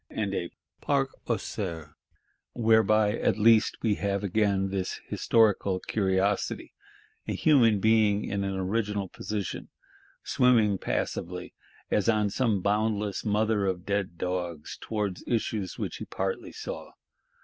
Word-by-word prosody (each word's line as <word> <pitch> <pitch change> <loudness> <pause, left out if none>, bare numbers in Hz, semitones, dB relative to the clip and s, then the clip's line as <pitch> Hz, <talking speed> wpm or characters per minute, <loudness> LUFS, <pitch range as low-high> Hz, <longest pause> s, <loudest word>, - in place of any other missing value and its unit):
and 100 -2 -2
a 85 -3 -2 0.3
Parc 135 -2 +1 0.2
aux 115 - +1
cerfs. 80 -7 -5 0.6
Whereby 110 -2 +3
at - - +1
least 110 0 +4
we 110 -3 +3
have 100 0 0
again 100 -1 +1
this 95 -1 -2
historical 105 -4 +2
curiosity: 95 0 -1 0.5
a - - -1
human 120 -9 +4
being 105 -1 +3
in 100 0 -2
an 95 0 -2
original 100 +1 -1
position; 105 0 -5 0.5
swimming 110 -6 +3
passively, - - -3 0.4
as 105 +2 +2
on 105 -2 +2
some 110 -5 +1
boundless 105 -1 0
"Mother 105 -1 +1
of 90 -1 -2
Dead 100 -4 -2
Dogs," 90 -4 -3
towards 105 -4 -3
issues 110 -5 -1
which - - -4
he - - -6
partly 95 0 -3
saw. - - -7
105 Hz, 125 wpm, -28 LUFS, 95-110 Hz, 0.6 s, least